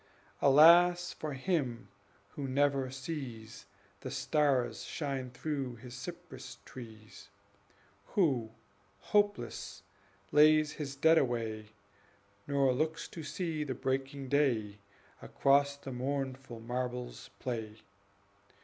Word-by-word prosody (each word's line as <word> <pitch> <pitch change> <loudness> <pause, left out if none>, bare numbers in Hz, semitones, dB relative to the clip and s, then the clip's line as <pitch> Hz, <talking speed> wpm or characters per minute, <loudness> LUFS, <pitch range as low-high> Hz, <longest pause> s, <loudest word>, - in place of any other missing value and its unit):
Alas 175 +5 +7
for 155 -2 -5
him 130 - -1 0.4
who 140 +4 -5
never 135 0 +1
sees 130 -6 -7 0.3
The - - -6
stars 130 -3 +1
shine 135 -4 -3
through 135 -1 -3
his 120 +1 -11
cypress 130 -2 -8
trees 110 -4 -12 0.9
Who, 135 - +2 0.5
hopeless, 205 - -1 0.5
lays 155 0 +6
his 140 -3 -5
dead 160 +3 +5
away, 115 -4 -2 0.8
Nor 140 -2 +3
looks 160 +5 -1
to 165 - -8
see 160 0 -3
the 135 -3 -4
breaking 135 +2 -2
day 120 -8 +1 0.4
Across 140 +1 +2
the 140 -1 -8
mournful 130 -2 -4
marbles 125 +1 -4
play! 110 -3 -5
135 Hz, 100 wpm, -32 LUFS, 120-150 Hz, 0.9 s, Alas